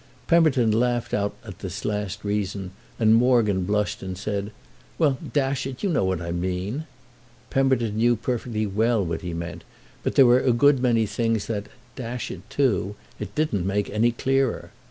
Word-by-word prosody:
Pemberton 140 -9 +4
laughed 120 +2 0
out 100 0 0
at 100 -4 -9
this 95 +1 -6
last 105 -1 -3
reason, 100 -2 -2 0.3
and 110 -1 +4
Morgan 115 -6 +3
blushed 105 +1 0
and 95 -1 -5
said: 100 +1 -3 0.5
"Well, 140 -5 +2
dash 135 -2 0
it, 135 +5 -8
you 200 - +1
know 140 - +2
what 95 -2 0
I 85 - -4
mean." 95 - -3 0.6
Pemberton 130 -5 +1
knew 120 +2 +4
perfectly 115 -1 -2
what 100 -5 0
he 85 -2 -4
meant; 85 -1 -6 0.4
but - - -2
there 135 - +8
were 120 +1 +6
a 125 - +3
good 135 +3 +4
many 120 -3 +2
things 115 -1 -1
that—dash 120 +3 -6
it - - -10
too!—it 105 -4 -2
didn't 105 - 0
make 100 +1 -1
any 110 +3 +3
clearer. 135 +1 0
110 Hz, 160 wpm, -24 LUFS, 100-125 Hz, 0.6 s, there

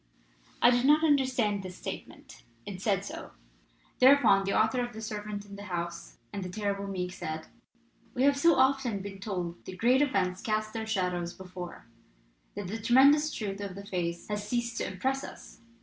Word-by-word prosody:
I 240 - +8
did 245 0 +2
not 300 +3 +5
understand 255 -9 +2
this 185 -1 -8
statement, - - -8 0.2
and 185 -2 -7
said 200 -2 +1
so. 325 +3 -8 0.7
Thereupon 250 -7 +6
the 195 - 0
author 220 +3 +2
of 240 0 -5
The 220 - -7
Servant 210 -1 -5
in 200 -1 -10
the 205 - -8
House 170 -2 -5 0.2
and 200 - -3
The 180 - -5
Terrible 200 0 -2
Meek 180 -2 -3
said: 160 -3 -5 0.7
"We 250 - +1
have 280 0 +5
so 330 +3 +5
often 260 -6 +2
been 195 -1 -7
told 180 -4 -4
that 185 - -8
great 250 +6 +4
events 190 -9 +1
cast 215 0 -1
their 220 -1 -4
shadows 180 -4 -1
before, 180 -5 -9 0.7
that 205 0 -4
the 220 +5 -4
tremendous 280 +6 +5
truth 205 -5 -4
of 195 -2 -5
the 200 0 -8
phrase 170 -3 -3
has 210 0 -4
ceased 235 -1 -1
to - - -1
impress 265 +9 -1
us. - - -11
205 Hz, 180 wpm, -29 LUFS, 185-245 Hz, 0.7 s, I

